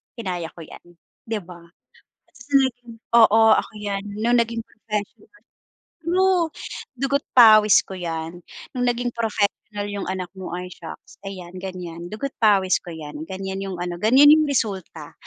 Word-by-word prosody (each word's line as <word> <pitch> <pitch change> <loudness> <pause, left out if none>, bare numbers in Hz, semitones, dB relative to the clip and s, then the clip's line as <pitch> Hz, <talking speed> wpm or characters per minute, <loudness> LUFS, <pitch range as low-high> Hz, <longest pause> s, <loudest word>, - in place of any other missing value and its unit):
"Kinaya 180 -7 -4
ko 170 - -11
yan", 160 - -12 0.4
di 220 -2 -2
ba? 175 -1 -13 0.7
At - - -35
sa 250 +3 -15
naging 245 -3 -2 0.2
"Oo 225 -1 +6
ako - - -2
yan." 200 -1 -3 0.2
Nung 240 +2 +3
naging 230 0 -1
professional 215 - -7 0.6
true, 360 +1 +2 0.5
"Dugo't 275 +3 -1
pawis 215 -3 +8
ko - - -10
yan." 165 -1 -5 0.3
Nung 250 -2 -1
naging 245 0 0
professional 220 -3 0 0.3
yung 205 -2 -4
anak 185 -1 -4
mo, 190 -1 -8
ay, 180 - -5
shocks, 165 - -12
"Ayan 185 -3 -8
ganyan 175 -2 -7
dugo't 265 +6 -5
pawis 195 -4 +4
ko 180 - -11
yan," 150 -2 -8
ganyan 190 0 -5
yung 195 -2 -5
ano 175 0 -5
ganyan 255 +7 +6
yung 310 -1 +3
resulta 190 - -3
205 Hz, 155 wpm, -23 LUFS, 180-240 Hz, 0.7 s, pawis